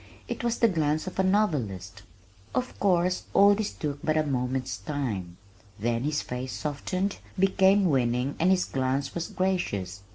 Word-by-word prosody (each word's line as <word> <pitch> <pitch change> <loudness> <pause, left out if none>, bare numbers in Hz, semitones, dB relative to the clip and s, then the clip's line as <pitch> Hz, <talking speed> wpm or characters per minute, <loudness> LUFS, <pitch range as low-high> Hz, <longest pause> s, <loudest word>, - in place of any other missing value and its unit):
It - - -4
was 235 0 0
the 230 - +5
glance 155 -5 0
of 185 - -6
a - - +4
novelist. 120 - 0 0.5
Of 250 0 -2
course 180 -2 +2
all 200 +1 +7
this 215 0 -2
took 145 -2 -4
but 155 0 +1
a 155 - +2
moment's 130 -1 -1
time. 105 - -4 0.4
Then 115 +3 -1
his 150 0 0
face 125 +1 -5
softened, 185 +7 -2 0.2
became 195 +1 +4
winning 125 -3 +1
and 175 - +3
his 190 -1 +3
glance 130 +1 -1
was 170 -1 -3
gracious. 100 - -2
150 Hz, 160 wpm, -27 LUFS, 125-190 Hz, 0.5 s, all